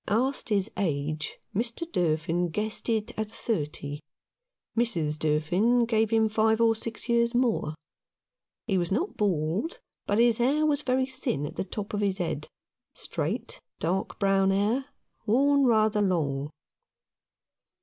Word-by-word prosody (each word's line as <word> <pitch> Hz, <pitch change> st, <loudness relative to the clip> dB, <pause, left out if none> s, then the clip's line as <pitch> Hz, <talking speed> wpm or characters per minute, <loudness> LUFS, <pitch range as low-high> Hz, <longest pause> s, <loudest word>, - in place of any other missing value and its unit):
Asked 255 Hz, +6 st, 0 dB
his 205 Hz, 0 st, +1 dB
age, 155 Hz, -3 st, -2 dB, 0.2 s
Mr. 235 Hz, -, -1 dB
Durfin 165 Hz, -, +1 dB
guessed 215 Hz, +7 st, -3 dB
it 225 Hz, 0 st, 0 dB
at 215 Hz, -1 st, -2 dB
thirty. 150 Hz, -9 st, -3 dB, 0.8 s
Mrs. 170 Hz, -11 st, 0 dB
Durfin 175 Hz, +11 st, +2 dB
gave 225 Hz, -2 st, +2 dB
him 220 Hz, -1 st, +3 dB
five 220 Hz, +1 st, +2 dB
or 225 Hz, -1 st, +4 dB
six 225 Hz, +1 st, -6 dB
years 235 Hz, 0 st, +2 dB
more. 235 Hz, -11 st, +1 dB, 0.9 s
He 195 Hz, -4 st, +1 dB
was 175 Hz, 0 st, -2 dB
not 320 Hz, -, 0 dB
bald, 195 Hz, -, 0 dB, 0.3 s
but 205 Hz, -, +1 dB
his 235 Hz, 0 st, +4 dB
hair 285 Hz, +6 st, +3 dB
was 295 Hz, -1 st, +2 dB
very 260 Hz, -1 st, +1 dB
thin 255 Hz, -, -3 dB
at -, -, -7 dB
the -, -, -1 dB
top 200 Hz, +2 st, -6 dB
of 205 Hz, -, 0 dB
his 195 Hz, -2 st, +1 dB
head, 165 Hz, -5 st, -3 dB, 0.5 s
straight, -, -, -3 dB, 0.2 s
dark 180 Hz, +4 st, -2 dB
brown 195 Hz, -1 st, +3 dB
hair, 210 Hz, +7 st, +1 dB, 0.4 s
worn 280 Hz, +5 st, +4 dB
rather 215 Hz, -3 st, +3 dB
long. 150 Hz, -7 st, 0 dB
210 Hz, 140 wpm, -27 LUFS, 175-235 Hz, 0.9 s, or